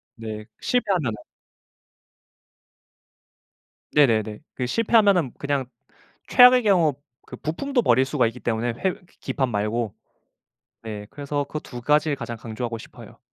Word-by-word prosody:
네 110 -1 -7 0.2
실패하면은 190 - 0 2.8
네네네. 110 -7 +2 0.2
그 125 - -2
실패하면은 200 - +3
그냥 140 -2 -1 0.6
최악의 250 0 +8
경우 175 -8 +4 0.3
그 - - -9
부품도 250 - -1
버릴 130 - +4
수가 130 -2 +1
있기 115 +2 -5
때문에 115 +2 -1
회 180 +11 -1 0.3
기판 130 -3 -1
말고 105 0 -1 0.9
네 105 -2 -6
그래서 145 0 -3
그 155 - -5
2 125 -4 -9
가지를 150 +3 +2
가장 120 -3 -6
강조하고 115 +1 -5
싶어요. 115 - -13
130 Hz, 255 characters per minute, -24 LUFS, 115-160 Hz, 2.8 s, 최악의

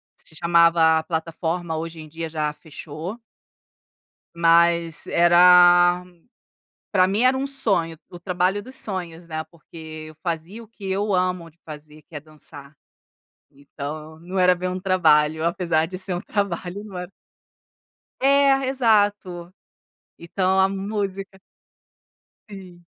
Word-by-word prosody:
Se 160 - -10
chamava 165 -1 +4
Plataforma, 165 +1 -3
hoje 165 0 -6
em 155 - -11
dia 165 +2 -6
já 155 -1 -2
fechou. 160 +6 -9 1.2
Mas 170 -1 +3
era 175 +1 +5 0.9
para 185 -3 +4
mim 200 +4 0
era 255 +1 +4
um 270 +1 -2
sonho, 195 -12 0
o - - -10
o - - -13
trabalho 180 +2 -1
dos 255 +4 -10
sonhos, 175 -7 -4
né, 155 -1 -5
porque 160 -1 -11
eu 155 - -14
fazia 175 +5 -5
o - - -21
que 200 -3 -8
eu 200 +1 -1
amo 180 -2 -1
de 160 - -35
fazer 150 0 -12
que 170 - -18
é - - -6
dançar. 150 -1 -13 0.8
Então 150 +3 -9
não 180 +3 -7
era 180 0 +4
bem 180 +1 -4
um 185 +1 -4
trabalho, 160 -5 +2
apesar 170 -2 0
de 185 +3 -8
ser 190 0 -2
um 175 - -4
trabalho, 200 -2 -3
não 200 -4 -9
e 180 - -6 1.1
É, 275 0 +3
exato. 205 -8 0 0.6
Então 185 +2 -1
a 190 0 +4
música 195 -1 -4 1.1
Sim. 185 -4 -13
175 Hz, 135 wpm, -22 LUFS, 160-195 Hz, 1.2 s, era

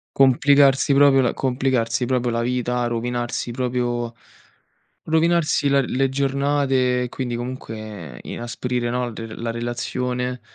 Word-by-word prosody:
Complicarsi 140 +1 +4
proprio 140 -1 +6
la 120 - +1
complicarsi 125 -2 0
proprio 125 -1 0
la 115 0 0
vita, 125 0 -1
rovinarsi 120 +1 -2
proprio 120 -1 -2 0.9
rovinarsi 160 -2 +2
la 140 0 +4
le 135 +1 0
giornate 135 -2 +1
e - - -4
quindi, 125 -1 -4
comunque, 110 - -7
inasprire, 120 0 -3
no, 125 -1 -2
re 115 0 -7
la 115 0 -3
relazione. 125 +1 -3
125 Hz, 120 wpm, -22 LUFS, 120-135 Hz, 0.9 s, proprio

